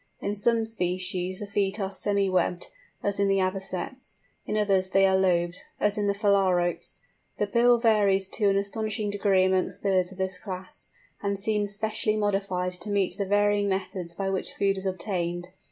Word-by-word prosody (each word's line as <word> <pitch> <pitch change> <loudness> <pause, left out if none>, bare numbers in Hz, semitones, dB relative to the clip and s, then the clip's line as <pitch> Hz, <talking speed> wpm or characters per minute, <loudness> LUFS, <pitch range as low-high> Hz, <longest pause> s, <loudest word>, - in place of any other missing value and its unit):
In 200 - -2
some 225 +2 +1
species 185 -3 -2
the - - -3
feet 200 0 -1
are 195 -1 -2
semi 200 0 0
webbed, 180 -1 0 0.3
as 200 0 0
in 200 - +3
the 195 0 +3
Avocets, 190 +6 -3 0.3
in 215 - -1
others 195 -3 +2
they 195 +1 +4
are 190 0 +4
lobed, 175 -2 +2 0.2
as 210 0 +2
in 205 -1 0
the 200 - +1
Phalaropes. 190 -4 +1 0.4
The 210 - +1
bill 235 +4 +4
varies 205 -4 +3
to 205 -3 +1
an 195 - +2
astonishing 210 +1 -2
degree 195 -2 +3
amongst 185 0 0
birds 190 -2 +2
of 190 - -12
this 190 0 -3
class, 185 -2 -8 0.3
and 200 -1 -1
seems 205 0 -1
specially 215 0 0
modified 195 -3 0
to 180 +3 -6
meet 195 -3 +1
the 200 - -1
varying 205 0 +2
methods 185 -2 -3
by 195 +1 -2
which 190 - -3
food 195 -1 +1
is 190 - -4
obtained. 175 -2 -2
195 Hz, 180 wpm, -27 LUFS, 185-205 Hz, 0.4 s, they